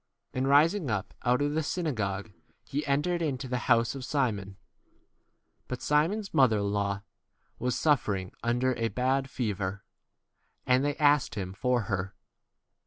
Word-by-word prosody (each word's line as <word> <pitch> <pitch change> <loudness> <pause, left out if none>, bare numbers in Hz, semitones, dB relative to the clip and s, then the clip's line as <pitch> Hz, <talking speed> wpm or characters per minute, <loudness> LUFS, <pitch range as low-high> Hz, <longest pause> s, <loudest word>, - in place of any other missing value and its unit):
And 130 +1 0
rising 155 +3 +4
up 105 -2 -2
out 125 +3 +2
of 145 0 0
the 160 - +1
synagogue, 110 - -2 0.3
he 145 +2 -2
entered 150 +5 +1
into 140 -4 -2
the 125 0 -1
house 115 0 +4
of 135 -2 -6
Simon. 110 -8 -1 1.1
But 125 - -4
Simon's 180 +8 +1
mother 125 -5 +5
in 100 0 -1
law 100 -1 -1 0.6
was 125 +1 0
suffering 100 - +1
under 120 +2 +1
a 115 - 0
bad 130 +5 0
fever; 100 -6 -3 0.8
and 130 +1 +3
they 145 0 0
asked 145 -6 +3
him 95 -3 -3
39 - - -9
for 125 +3 +1
her. 100 -2 -3
125 Hz, 150 wpm, -29 LUFS, 105-145 Hz, 1.1 s, mother